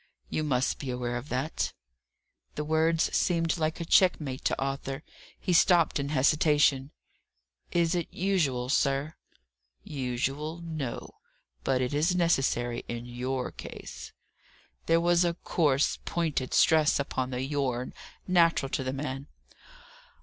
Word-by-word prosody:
You 155 - -1
must 130 -4 0
be 135 - -5
aware 125 -1 -2
of 120 +5 -5
that." 135 +5 -2 0.8
The 150 - -2
words 160 +1 +1
seemed 165 -2 +1
like 155 +1 -1
a 170 - -3
checkmate 155 -7 +2
to - - +1
Arthur. 135 +1 -3 0.4
He 180 - -1
stopped 170 -3 +4
in 140 0 -2
hesitation. 145 -1 +3 0.8
"Is 170 0 +2
it 175 -2 -2
usual, 155 -10 0
sir?" 140 +2 +1 0.7
"Usual 140 +4 -3
no! 155 -7 -5 0.4
But 130 -1 +1
it 125 - -2
is 160 +5 +2
necessary 135 -8 +1
in 120 0 -5
your 125 +1 -3
case" - - -9 0.8
There 165 0 +4
was 175 +1 +3
a 170 -1 0
coarse, 150 -5 +1
pointed 155 -7 -1
stress 155 -2 +4
upon 130 -2 -2
the 125 0 -3
"your," 130 -3 -2 0.4
natural 170 -6 +3
to 135 - -2
the 130 0 -2
man. 135 0 -4
145 Hz, 130 wpm, -28 LUFS, 130-165 Hz, 0.8 s, stopped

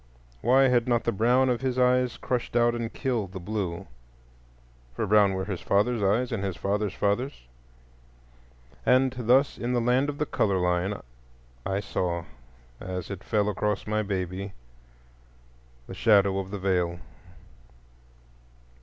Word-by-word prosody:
Why 130 +3 +5
had 120 -1 +2
not 120 -2 +2
the 115 - +1
brown 120 +5 +3
of 125 -1 0
his 130 -1 -1
eyes 125 -1 +2
crushed 125 -1 -3
out 120 0 +4
and 115 -1 -3
killed 115 -9 -2
the 95 - -5
blue?—for 90 -3 -4 1.2
brown 100 -2 +4
were 95 0 -2
his 95 -4 -4
father's 110 +3 +1
eyes, 110 +6 +1
and 110 -4 -2
his 95 -4 -3
father's 100 0 -1
father's. 105 +7 -1 1.4
And 130 - +3
thus 125 +3 +2
in 120 +1 -2
the 120 - +2
Land 125 +4 +2
of 145 - -4
the 150 - 0
Color 115 -8 0
line 90 +2 0 0.7
I 95 +1 -1
saw, 85 -4 -2 0.5
as 90 0 -5
it 95 -2 -7
fell 105 -2 +1
across 105 0 -1
my 110 0 0
baby, 95 -1 -4 1.3
the - - -9
shadow 100 -3 +3
of 95 -1 -5
the 100 - -4
Veil. 90 -3 0
105 Hz, 145 wpm, -27 LUFS, 95-125 Hz, 1.4 s, Why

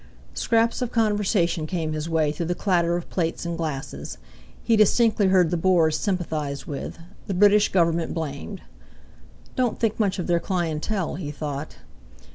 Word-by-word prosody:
Scraps 230 +1 +1
of 245 -1 -2
conversation 205 -7 +1
came 160 -3 -2
his 155 +1 -4
way 160 -2 +2
through 160 +2 -4
the 175 - -1
clatter 175 -3 +1
of 175 - -6
plates 165 -1 -2
and 170 0 -2
glasses. 155 -4 -5 0.5
He 230 - +3
distinctly 215 0 +4
heard 185 -3 +4
the 175 - +1
Boers 165 -3 +3
sympathised 155 -8 -2
with, 140 - -6 0.3
the 195 - -2
British 205 +2 +5
Government 170 -2 +2
blamed. 160 +4 -5 0.9
"Don't 250 -3 0
think 225 -1 0
much 200 -4 +1
of 180 - -3
their 170 -1 +2
clientèle," 175 0 -2
he 150 - -4
thought. 145 0 -5
175 Hz, 155 wpm, -24 LUFS, 160-205 Hz, 0.9 s, British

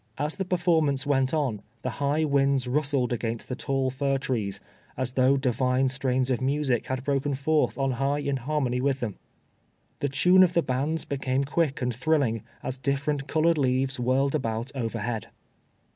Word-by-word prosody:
As 150 +2 -1
the 190 - -2
performance 160 -6 +2
went 135 -2 +2
on, 135 -10 -1 0.2
the - - -1
high 145 +3 +2
winds 140 -3 +2
rustled 135 -2 +1
against 115 -1 -3
the 125 - -3
tall 135 -1 -1
fir 135 +1 0
trees, 115 -7 -2 0.4
as 130 -1 -1
though 130 +1 +3
Divine 130 0 +1
strains 130 -1 0
of 125 - 0
music 135 -3 0
had 130 -1 -3
broken 140 0 0
forth 150 +3 +1
on 135 -1 +1
high 135 +3 0
in 140 -2 -1
harmony 130 -2 -1
with 135 0 +1
them. 115 -6 -4 0.8
The 145 - 0
tune 180 +7 +5
of 180 -1 +5
the 170 - +2
bands 140 +6 -1
became 135 -1 -1
quick 140 -2 0
and 125 0 0
thrilling, 125 -3 +1 0.2
as 130 0 -4
different 140 +1 -1
colored 160 0 +2
leaves 130 0 +1
whirled 130 +3 +1
about 115 -4 -2
overhead. 115 -3 -3
135 Hz, 170 wpm, -26 LUFS, 125-145 Hz, 0.8 s, tune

